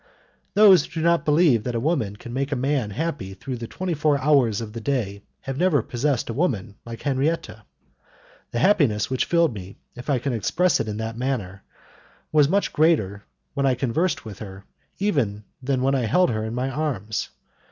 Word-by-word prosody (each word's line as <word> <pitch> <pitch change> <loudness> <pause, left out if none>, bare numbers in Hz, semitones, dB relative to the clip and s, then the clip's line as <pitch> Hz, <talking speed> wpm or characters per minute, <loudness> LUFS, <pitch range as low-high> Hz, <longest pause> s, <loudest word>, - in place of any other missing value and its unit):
Those 200 -6 +7
who - - -15
do 160 - -2
not 170 -2 +3
believe 150 -7 +4
that 125 0 -3
a - - +1
woman 120 - 0
can 120 +3 -9
make 135 +2 -2
a - - +1
man 130 -3 0
happy 140 - -4
through 125 +6 -5
the 115 0 -6
twenty 185 +5 -3
four 150 -1 +2
hours 130 -7 +3
of 110 -2 -6
the 115 - -6
day 105 -6 -2 0.2
have 135 0 -5
never 165 -9 +3
possessed 130 +1 -1
a 115 - -3
woman 120 - -1
like 115 -1 -8
Henriette. 145 +4 0 1.0
The - - -4
happiness 140 - +3
which 130 - +1
filled 170 -5 +2
me, 95 -2 -9 0.2
if 125 +4 -9
I 140 - +3
can 130 +2 -2
express 170 - +1
it - - -2
in 105 -1 -3
that 110 +1 -4
manner, 105 -8 -3 0.7
was 150 -2 +4
much 200 +3 +1
greater 110 - +2 0.3
when 140 -1 +1
I 130 - +3
conversed 135 +8 -1
with 105 -4 -8
her 95 -2 -9 0.3
even 130 - 0 0.2
than 130 -1 0
when 135 +1 +2
I 125 -4 +1
held 180 - +3
her 110 -1 -2
in 110 +1 -4
my 130 +2 -1
arms. 125 -9 -2
130 Hz, 195 wpm, -24 LUFS, 110-150 Hz, 1.0 s, Those